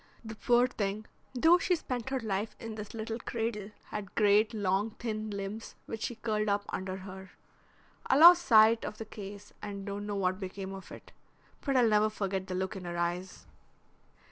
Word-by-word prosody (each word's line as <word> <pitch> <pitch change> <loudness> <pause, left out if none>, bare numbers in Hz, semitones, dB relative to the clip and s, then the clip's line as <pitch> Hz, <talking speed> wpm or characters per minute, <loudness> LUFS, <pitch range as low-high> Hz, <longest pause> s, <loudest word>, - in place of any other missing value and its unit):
The 220 - -6
poor 240 +2 +3
thing, 215 -4 -3 0.3
though 325 +8 +6
she 360 +1 +2
spent 255 -6 -4
her 265 0 -1
life 210 -1 -2
in 225 -1 -6
this 210 0 -7
little 225 +1 -4
cradle, 225 -4 -3 0.2
had 205 -3 -6
great, 210 +1 +4
long, 205 0 0
thin 215 -2 -3
limbs 200 +2 -6
which 225 - -6
she 240 - -3
curled 215 -2 -1
up 205 0 0
under 190 0 -3
her. 190 0 -9 0.8
I - - +4
lost 345 +3 +9
sight 225 -3 +6
of 210 - -5
the 225 - -6
case 205 -1 -9
and 200 -1 -6
don't 205 0 -5
know 205 - -2
what 185 -1 0
became 190 0 -6
of 190 -1 -10
it, - - -11 0.5
but 275 -2 +1
I'll 245 -2 +5
never 215 0 +4
forget 195 -3 -3
the 185 - -3
look 190 +2 -2
in 185 -2 -7
her 175 0 -4
eyes." 175 +2 -3
210 Hz, 190 wpm, -31 LUFS, 195-225 Hz, 0.8 s, lost